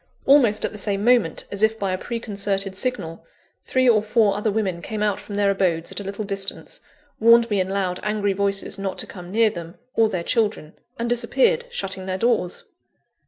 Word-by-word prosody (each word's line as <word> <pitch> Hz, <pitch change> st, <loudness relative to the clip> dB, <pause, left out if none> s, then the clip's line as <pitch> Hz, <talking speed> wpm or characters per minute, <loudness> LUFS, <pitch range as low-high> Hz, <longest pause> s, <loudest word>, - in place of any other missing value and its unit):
Almost 245 Hz, -7 st, +5 dB
at -, -, -2 dB
the 210 Hz, -, -7 dB
same 200 Hz, -1 st, 0 dB
moment, 240 Hz, -10 st, +3 dB
as 200 Hz, -, -4 dB
if 220 Hz, +1 st, +3 dB
by 195 Hz, -3 st, -1 dB
a 185 Hz, -, -1 dB
preconcerted 200 Hz, -4 st, -2 dB
signal, 190 Hz, -8 st, -2 dB, 0.4 s
three 255 Hz, 0 st, +1 dB
or 220 Hz, -3 st, +5 dB
four 215 Hz, -2 st, +2 dB
other 210 Hz, +2 st, 0 dB
women 195 Hz, -5 st, -1 dB
came 215 Hz, +2 st, -3 dB
out 205 Hz, -2 st, 0 dB
from 205 Hz, -, -8 dB
their 200 Hz, -1 st, +3 dB
abodes 175 Hz, -4 st, 0 dB
at -, -, -5 dB
a -, -, -5 dB
little 200 Hz, +2 st, -5 dB
distance, 195 Hz, -1 st, -3 dB, 0.4 s
warned 230 Hz, +1 st, +6 dB
me 205 Hz, -, +2 dB
in 185 Hz, 0 st, 0 dB
loud, 190 Hz, -2 st, -1 dB
angry 210 Hz, -1 st, 0 dB
voices 195 Hz, 0 st, -1 dB
not 195 Hz, -1 st, -3 dB
to -, -, -4 dB
come 180 Hz, -2 st, -10 dB
near 220 Hz, +2 st, +3 dB
them, 170 Hz, -2 st, -8 dB, 0.2 s
or 225 Hz, -1 st, +3 dB
their 180 Hz, -4 st, -2 dB
children; 210 Hz, -8 st, -1 dB, 0.2 s
and 235 Hz, -, -2 dB
disappeared, 260 Hz, -, +2 dB
shutting 190 Hz, -, -4 dB
their 185 Hz, 0 st, -1 dB
doors. 230 Hz, -, 0 dB
205 Hz, 200 wpm, -23 LUFS, 190-225 Hz, 0.4 s, warned